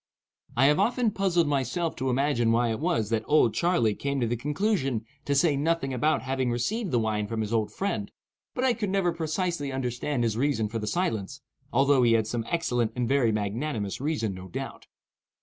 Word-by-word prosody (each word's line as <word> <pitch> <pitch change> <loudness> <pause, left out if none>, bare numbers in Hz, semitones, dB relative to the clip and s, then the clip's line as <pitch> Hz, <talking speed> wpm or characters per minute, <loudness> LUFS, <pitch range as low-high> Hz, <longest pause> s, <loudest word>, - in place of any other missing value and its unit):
I 135 - +5
have 150 +1 +4
often 240 -1 +2
puzzled 180 -5 +1
myself 145 +4 -1
to 130 - -1
imagine 125 -3 +2
why 115 0 +2
it 110 - -3
was 155 - 0
that 110 -1 +2
"Old 145 -7 +4
Charley" 170 -12 +2
came 140 +4 -2
to 120 - +1
the 120 +1 0
conclusion 145 - -1 0.2
to 140 - +1
say 150 +1 +3
nothing 145 -2 0
about 150 +5 +1
having 130 -1 -1
received 190 - -1
the 125 - +1
wine 110 -2 0
from 110 +1 -2
his 110 +1 -3
old 110 -2 0
friend, 110 - -3 0.4
but 250 - -1
I 260 -2 +4
could 215 -4 -3
never 190 -2 +1
precisely 165 -2 -2
understand 125 0 -2
his 115 -2 0
reason 125 -5 +1
for 115 +1 -3
the 105 - -4
silence, 110 - -2 0.3
although 135 +1 +4
he 120 -2 +4
had 110 -1 +3
some 115 +1 -3
excellent 125 -9 0
and 125 -1 -1
very 135 -4 +3
magnanimous 105 +1 -2
reason, 140 -9 -1
no 95 0 -9
doubt. 85 - -7
135 Hz, 200 wpm, -27 LUFS, 115-160 Hz, 0.4 s, I